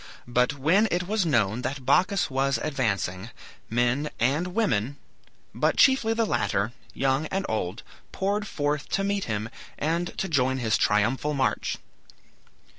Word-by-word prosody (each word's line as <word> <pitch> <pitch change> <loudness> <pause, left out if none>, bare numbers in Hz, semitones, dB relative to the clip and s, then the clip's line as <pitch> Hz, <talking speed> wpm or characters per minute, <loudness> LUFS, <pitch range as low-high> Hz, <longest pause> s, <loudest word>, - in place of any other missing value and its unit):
But 125 +3 +1
when 175 +11 +3
it 175 +1 -1
was 205 -3 +1
known 115 -5 +1
that 135 0 -4
Bacchus 185 +6 +2
was 135 +1 +1
advancing, 105 - -1 0.4
men 120 +5 +1
and 140 +9 +1
women, 140 - 0 0.6
but - - +1
chiefly 250 -4 +4
the 230 0 +2
latter, 105 - 0 0.2
young 135 +3 +1
and 195 +3 -2
old, 105 -1 -3 0.3
poured 205 +2 -1
forth 145 -2 -2
to 195 - +1
meet 200 0 -1
him 105 -1 -2 0.3
and 170 +3 -2
to 195 - -1
join 130 -5 +1
his 115 -4 +1
triumphal 120 +8 +1
march. 135 - 0
140 Hz, 140 wpm, -26 LUFS, 120-180 Hz, 0.6 s, chiefly